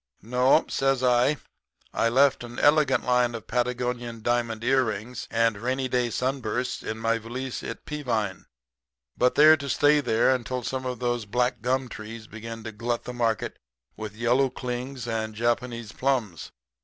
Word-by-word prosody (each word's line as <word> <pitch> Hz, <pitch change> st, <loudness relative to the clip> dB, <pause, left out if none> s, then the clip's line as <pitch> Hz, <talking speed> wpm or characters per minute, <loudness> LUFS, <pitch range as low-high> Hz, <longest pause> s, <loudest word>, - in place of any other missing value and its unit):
"'No,' 125 Hz, +6 st, +3 dB
says 135 Hz, -1 st, +1 dB
I, 125 Hz, +4 st, +3 dB, 0.6 s
'I 115 Hz, -, +2 dB
left 135 Hz, +1 st, +3 dB
an 120 Hz, 0 st, -9 dB
elegant 145 Hz, -4 st, +3 dB
line 125 Hz, -1 st, +2 dB
of 110 Hz, -5 st, -7 dB
Patagonian 120 Hz, -1 st, -2 dB
diamond 115 Hz, -2 st, 0 dB
earrings 120 Hz, -2 st, 0 dB
and 115 Hz, -2 st, +1 dB
rainy 130 Hz, +2 st, -1 dB
day 125 Hz, -1 st, +1 dB
sunbursts 125 Hz, 0 st, -2 dB
in 110 Hz, -, -4 dB
my 115 Hz, 0 st, 0 dB
valise 125 Hz, +3 st, -5 dB
at 115 Hz, -, -7 dB
Peavine. 115 Hz, -10 st, -2 dB, 0.7 s
But 125 Hz, 0 st, +2 dB
they're 155 Hz, +2 st, +8 dB
to 140 Hz, -1 st, -6 dB
stay 145 Hz, +3 st, +4 dB
there 120 Hz, 0 st, +3 dB
until 125 Hz, 0 st, -3 dB
some 130 Hz, +2 st, -3 dB
of 125 Hz, -1 st, -3 dB
those 120 Hz, -2 st, -1 dB
black 125 Hz, +4 st, 0 dB
gum 130 Hz, +1 st, 0 dB
trees 110 Hz, 0 st, -8 dB
begin 115 Hz, +1 st, -8 dB
to 110 Hz, -, -5 dB
glut 115 Hz, +2 st, -2 dB
the 125 Hz, -, -6 dB
market 115 Hz, -3 st, -1 dB, 0.4 s
with 110 Hz, -1 st, -7 dB
yellow 125 Hz, +3 st, +3 dB
clings 125 Hz, 0 st, -5 dB
and 110 Hz, -1 st, -2 dB
Japanese 120 Hz, 0 st, -1 dB
plums. 125 Hz, -, -1 dB
120 Hz, 155 wpm, -26 LUFS, 115-130 Hz, 0.7 s, they're